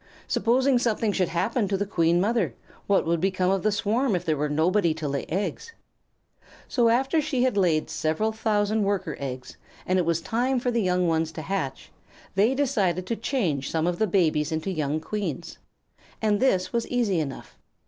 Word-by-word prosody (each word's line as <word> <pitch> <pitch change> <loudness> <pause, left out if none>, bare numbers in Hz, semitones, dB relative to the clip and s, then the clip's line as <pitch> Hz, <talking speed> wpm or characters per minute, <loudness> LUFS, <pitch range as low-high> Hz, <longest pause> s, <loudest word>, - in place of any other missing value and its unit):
Supposing 255 +2 +2
something 225 -2 0
should 185 -3 +1
happen 200 +7 0
to 195 0 0
the 205 - -1
Queen 170 -3 +2
Mother, 215 0 0 0.3
what 200 - +3
would 165 0 0
become 185 -1 +1
of 195 -1 +1
the 215 - +1
swarm 220 +3 +1
if 180 0 -3
there 160 -2 +1
were 150 +1 -1
nobody 165 +3 +2
to 160 -2 -4
lay 140 0 -3
eggs? 195 - -3 0.9
So 240 -3 +2
after 265 +7 +2
she 275 -4 0
had 255 -4 +1
laid 170 -6 +2
several 160 +8 -1
thousand 215 -1 0
Worker 195 -6 -1
eggs, 130 -2 -6 0.3
and 185 0 +2
it 175 - +1
was 170 -1 +2
time 245 +8 0
for 245 0 -1
the 235 -1 +1
young 180 -2 +1
ones 160 -1 0
to 160 - -6
hatch, 165 -9 -4 0.4
they 215 +7 +3
decided 200 - 0
to 230 - -2
change 185 - -1
some 160 0 0
of 175 0 -1
the 220 - +2
babies 160 -5 +1
into 160 +4 -2
young 155 -3 -1
Queens. 170 -2 -5 0.6
And 210 -2 +1
this 190 -8 +1
was 235 -1 0
easy 230 -8 +1
enough. 140 -4 -6
195 Hz, 190 wpm, -25 LUFS, 165-225 Hz, 0.9 s, what